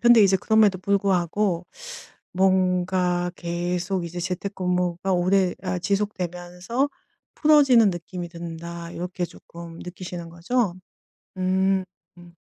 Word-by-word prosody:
근데 240 -2 +7
이제 195 -1 +5
그럼에도 210 -1 +3
불구하고 190 -2 +1 0.7
뭔가 180 -1 +2
계속 175 +1 -2
이제 175 +1 -5
재택근무가 180 0 -1
오래 185 +1 +2
아 185 -1 -1
지속되면서 185 - -2 0.5
'풀어지는 275 -8 +5
느낌이 175 0 -6
든다.' 170 0 -7
이렇게 180 +1 -3
쪼끔 170 -1 -11
느끼시는 180 -1 -7
거죠? 190 +4 0 0.6
음 190 +1 +2 0.3
음. 175 0 -15
180 Hz, 255 characters per minute, -24 LUFS, 175-195 Hz, 0.7 s, 근데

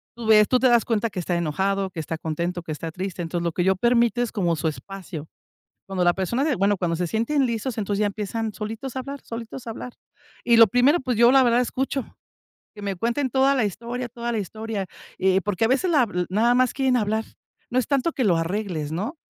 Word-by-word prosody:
Tú 235 -1 -7
ves, 210 -1 +6
tú 255 - +3
te 260 - +3
das 240 -2 +4
cuenta 225 -1 0
que 185 - -4
está 175 0 -1
enojado, 190 +4 -1
que 165 - -7
está 160 +1 -4
contento, 170 +3 -3
que 160 - -6
está 160 +2 -5
triste. 185 +1 -5
Entonces, 170 +1 -3
lo 170 - 0
que 175 +2 -1
yo 190 +1 +3
permito 235 +2 +2
es 240 - -1
como 175 -7 0
su 160 +1 -2
espacio. 170 -1 -6 0.6
Cuando 190 -2 -1
la 175 - +5
persona 195 +9 -1
de 300 -3 +1
bueno, 200 +2 +2
cuando 175 -2 -1
se 175 0 -1
sienten 250 - +1
listos, 235 +1 -3
entonces 205 0 -1
ya 210 - +3
empiezan 215 +2 -3
solitos 225 +5 -6
a - - 0
hablar, 280 +2 -7
solitos 230 +2 -8
a - - -4
hablar. 240 +2 -7 0.5
Y 235 -1 +5
lo 230 - +9
primero, 245 - +3
pues, 255 -2 -2
yo 235 +2 +6
la 270 -1 +6
verdad 240 0 +3
escucho. 265 +1 -1 0.7
Que 205 - -10
me 200 -1 -2
cuenten 240 +8 0
toda 265 +2 +3
la 245 - +2
historia 235 +5 -4
toda 240 0 -5
la 225 - -1
historia, 215 +1 -4 0.3
eh, 190 0 +3
porque 205 +1 0
a - - 0
veces 275 +9 +2
la 285 -8 +4 0.2
nada 225 +6 +3
más 255 -1 +3
quieren 265 -2 +2
hablar. 220 -1 0 0.5
No 250 - +1
es 255 - +1
tanto 280 +3 +1
que 275 - -2
lo 180 -5 +3
arregles, 165 -3 -2
¿no? 210 - -3
220 Hz, 235 wpm, -24 LUFS, 185-245 Hz, 0.7 s, lo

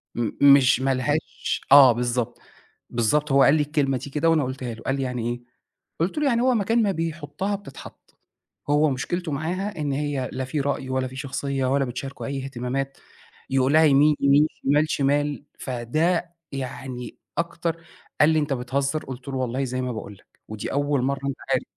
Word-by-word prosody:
م 115 -3 -1 0.2
مش 130 -2 +4
ما 135 0 +2
لهاش" 145 +5 -2
آه 140 -3 +10
بالضبط، 120 0 -2 0.5
بالضبط، 135 +6 +1
هو 135 0 +6
قال 140 - +6
لي 155 - +2
الكلمة 145 -3 0
دي 135 +3 -8
كده 150 +4 +1
وأنا 160 -2 +3
قٌلتها 130 -2 -4
له، 110 - -12
قال 135 - 0
لي: 135 - -2
"يعني 125 -2 -2
إيه؟"، 120 0 -5 0.6
قُلت 180 - 0
له: 300 - +1
"يعني 235 -4 +2
هو 255 0 +3
مكان 225 +2 +2
ما 205 -2 +2
بيحُطّها 165 +3 -3
بتتحط، 195 -9 -13 0.5
هو 150 +1 +4
مشكلته 165 +6 -3
معاها 180 +8 -3
إن 145 -2 -1
هي 140 -2 -2
لا 130 0 -3
في 145 +3 -3
رأي 140 -1 -2
ولا 130 0 0
في 130 - -11
شخصية 135 0 -2
ولا 135 +1 +2
بتشاركه 135 +3 -6
أي 135 -1 -3
إهتمامات، 135 +1 -3 0.5
يقول 135 +1 +2
لها 160 +1 +6
يمين، 150 +1 +5
يمين، 140 +2 +5 0.2
شمال، 150 +3 +3
شمال."، 145 +1 0
فده 160 +8 -1 0.2
يعني 130 -2 -6 0.2
أكتر 165 0 -2 0.4
قال 150 - +7
لي: 160 -1 +3
"أنت 145 -2 -1
بتهزّر؟"، 135 +4 -2
قُلت 130 0 -8
له: 135 - -4
"والله 130 +1 -1
زي 130 0 -2
ما 125 -1 -2
باقول 110 -3 -7
لك، 100 - -21 0.2
ودي 110 -1 -5
أول 145 -1 +1
مرّة 140 +1 -1
أنت 140 - -2
عارف". - - +2
140 Hz, 185 wpm, -24 LUFS, 130-155 Hz, 0.6 s, آه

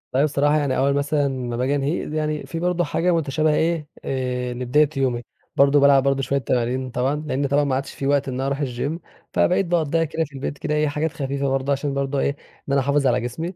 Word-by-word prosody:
أيوه 140 +3 +4
بصراحة 145 0 +2
يعني 140 -3 0
أول 140 +1 +2
مثلًا 145 0 +1
ما 125 -3 -3
باجي 130 +3 +1
أنهيه، 145 +2 -2
يعني 155 -1 -2
في 165 - -5
برضه 175 0 +1
حاجة 175 +1 0
مُتشابهة 155 0 +1
إيه 160 -2 0 0.2
آآ 125 -2 -2
لبداية 125 +4 +2
يومي، 125 -3 0 0.3
برضه 140 +1 +5
بالعب 140 -1 +5
برضه 135 0 +1
شوية 140 +1 0
تمارين 125 +1 -1
طبعًا، 125 +3 0
لإن 140 0 0
طبعًا 140 +2 +2
ما 140 -2 0
عادش 135 +1 -3
في 135 - -3
وقت 140 -1 +2
إن 130 - -3
أنا 130 +2 -2
أروح 140 +1 -2
الGym 140 +4 -2 0.4
فبقيت 190 +2 +2
باقضيها 165 -2 +1
كده 160 +1 -1
في 145 - -18
البيت 135 +1 -4
كده 150 - -2
إيه 150 0 +2
حاجات 150 +2 -1
خفيفة 140 0 -2
برضه، 135 +1 0
عشان 140 0 -1
برضه 140 0 -1
إيه - - +2 0.4
إن - - +1
أنا 140 - +4
أحافظ 140 +1 +2
على 125 0 +2
جسمي، 160 +10 -4
140 Hz, 225 wpm, -22 LUFS, 130-150 Hz, 0.4 s, برضه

